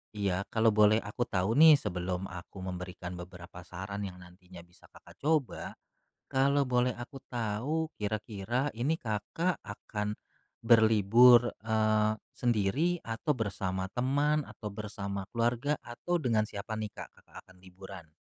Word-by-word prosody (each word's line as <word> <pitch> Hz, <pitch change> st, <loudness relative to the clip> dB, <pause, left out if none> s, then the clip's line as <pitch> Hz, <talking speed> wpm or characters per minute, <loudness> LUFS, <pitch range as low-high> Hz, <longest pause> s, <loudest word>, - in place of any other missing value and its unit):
iya, 100 Hz, -2 st, -1 dB
kalau 115 Hz, 0 st, +3 dB
boleh 105 Hz, 0 st, +5 dB
aku 105 Hz, +4 st, -3 dB
tahu 100 Hz, +8 st, +1 dB
nih 160 Hz, -1 st, +10 dB
sebelum 90 Hz, -6 st, -3 dB
aku 90 Hz, +2 st, -9 dB
memberikan 90 Hz, -1 st, -6 dB
beberapa 90 Hz, 0 st, -11 dB
saran 95 Hz, +3 st, -6 dB
yang 90 Hz, -, -9 dB
nantinya 90 Hz, 0 st, -14 dB
bisa 90 Hz, +1 st, -22 dB
Kakak 85 Hz, +2 st, -18 dB
coba, 150 Hz, -4 st, -1 dB, 0.5 s
kalau 140 Hz, +1 st, +2 dB
boleh 125 Hz, 0 st, +2 dB
aku 135 Hz, +2 st, -9 dB
tahu 120 Hz, +8 st, -1 dB
kira-kira 110 Hz, +4 st, -2 dB
ini 145 Hz, +8 st, 0 dB
Kakak 135 Hz, -, -1 dB
akan 105 Hz, 0 st, -4 dB, 0.5 s
berlibur, 115 Hz, +2 st, +6 dB, 0.2 s
eee, 110 Hz, -1 st, +2 dB, 0.2 s
sendiri 125 Hz, -, +1 dB
atau 115 Hz, +7 st, -1 dB
bersama 95 Hz, -6 st, -2 dB
teman 145 Hz, +4 st, +1 dB
atau 105 Hz, -, -9 dB
bersama 100 Hz, -1 st, -5 dB
keluarga 120 Hz, +5 st, 0 dB
atau 170 Hz, +9 st, -3 dB
dengan 115 Hz, -7 st, +2 dB
siapa 105 Hz, +1 st, -6 dB
nih 110 Hz, -1 st, -4 dB
Kak, -, -, -9 dB, 0.2 s
Kakak -, -, -24 dB
akan 95 Hz, -, -18 dB
liburan? 95 Hz, -2 st, -11 dB
110 Hz, 135 wpm, -30 LUFS, 95-125 Hz, 0.5 s, nih